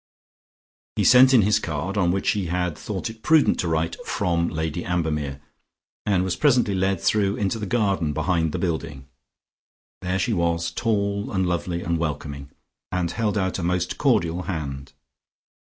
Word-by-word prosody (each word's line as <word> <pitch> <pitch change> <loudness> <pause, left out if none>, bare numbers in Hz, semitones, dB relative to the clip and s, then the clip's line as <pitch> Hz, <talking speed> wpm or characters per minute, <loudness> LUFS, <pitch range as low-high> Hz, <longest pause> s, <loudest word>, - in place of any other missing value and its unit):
He - - +1
sent 130 +1 +7
in 120 -5 +6
his 105 +1 +3
card, 80 +5 -3
on 90 -4 +2
which 95 +2 +1
he 100 -4 -2
had 90 -1 -1
thought 95 +2 -4
it 110 0 -9
prudent 155 +4 +4
to 85 - 0
write 80 0 -1
"From 85 -1 0
Lady 80 +2 -3
Ambermere," 75 -6 -2 0.7
and 95 -3 +2
was 95 -1 -1
presently 125 -8 +3
led 95 0 0
through 100 0 +1
into 105 +2 -1
the 105 - -4
garden 95 -7 +1
behind 80 +1 0
the - - -3
building. 80 -6 -3 1.0
There 90 0 -1
she 110 +5 0
was, 85 -2 0
tall 100 -1 -1
and 95 -2 0
lovely 85 0 -2
and 85 -1 -1
welcoming, 70 -3 -4 0.4
and 90 -2 -1
held 110 -2 -1
out 95 -1 -1
a - - -3
most 90 +1 -1
cordial 85 +2 +2
hand. 70 -7 -5
90 Hz, 165 wpm, -24 LUFS, 80-100 Hz, 1.0 s, sent